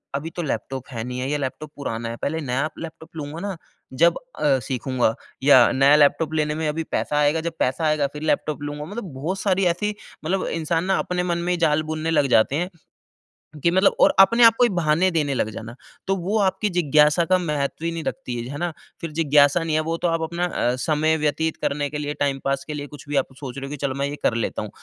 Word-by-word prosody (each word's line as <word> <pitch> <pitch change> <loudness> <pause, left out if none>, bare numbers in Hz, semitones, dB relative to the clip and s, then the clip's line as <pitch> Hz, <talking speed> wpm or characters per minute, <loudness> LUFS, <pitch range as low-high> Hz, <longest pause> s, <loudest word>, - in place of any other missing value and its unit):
अभी 155 +4 -3
तो 175 - -2
लैपटॉप 135 -3 -4
है 115 -2 -4
नहीं 125 +1 -5
है 130 +2 -2
या 150 - 0
लैपटॉप 145 +2 -5
पुराना 115 -4 -4
है। 115 - -5
पहले 160 +3 -1
नया 135 +3 -1
लैपटॉप 165 0 -9
लूँगा 150 +1 -6
ना 200 -1 -4 0.4
जब 170 +5 +4 0.2
अ, 140 -3 +3
सीखूँगा 125 -1 -1 0.3
या 130 -4 +7
नया 140 +2 +5
लैपटॉप 150 +2 +3
लेने 150 -1 0
में 160 -1 -2
अभी 160 +2 -2
पैसा 150 - -1
आएगा, 150 +2 +2
जब 170 0 -3
पैसा 130 +6 0
आएगा 150 -2 +2
फिर 150 - -7
लैपटॉप 150 -1 0
लूँगा, 145 0 -5
मतलब 200 - -7
बहुत 165 +9 -3
सारी 190 -1 +1
ऐसी 205 +5 0 0.3
मतलब 185 +4 0
इंसान 165 +1 -1
ना 190 - +2
अपने 180 0 -1
मन 170 -1 -1
में 175 +1 -1
ही - - -1
जाल 155 -1 +2
बुनने 160 +1 -2
लग 145 -3 +3
जाते 120 +5 +2
हैं 175 +4 -1 0.9
कि 170 - +4
मतलब 190 +2 +3
और - - +6
अपने 230 +5 +6
आप 225 0 +8
को 245 - +4
ही 240 - +5
बहाने 175 0 +2
देने 150 -4 0
लग 110 -4 0
जाना। 115 +2 -8 0.3
तो 195 - +2
वो 195 +4 -1
आपकी 195 +1 +1
जिज्ञासा 150 -1 +3
का 185 +2 +3
महत्व 150 -2 -2
ही 170 - 0
नहीं 165 -1 -5
रखती 125 -4 -4
है। 120 +1 -5
है 145 - -5
ना? 175 +1 -2 0.3
फिर 165 - -5
जिज्ञासा 150 +1 +4
नहीं 160 -2 -1
है 155 - +3
वो 165 +1 -2
तो 175 - 0
आप 165 -1 0
अपना 170 +2 -1
अ, 125 -7 0
समय 155 +4 +1
व्यतीत 155 +1 -1
करने 145 0 -1
के 150 - -5
लिए 150 0 -3
टाइम 140 -1 0
पास 140 0 0
के 150 - -4
लिए 145 -1 -5
कुछ 145 0 -13
भी 145 - -2
आप 135 - +2
सोच 135 -3 -7
रहे 135 - -5
हो, 140 - -9
कि 150 - -5
चलो 135 -1 -2
मैं 140 0 -1
ये 145 - -4
कर - - +3
लेता 115 - -2
हूँ। - - -6
155 Hz, 245 wpm, -23 LUFS, 140-170 Hz, 0.9 s, आप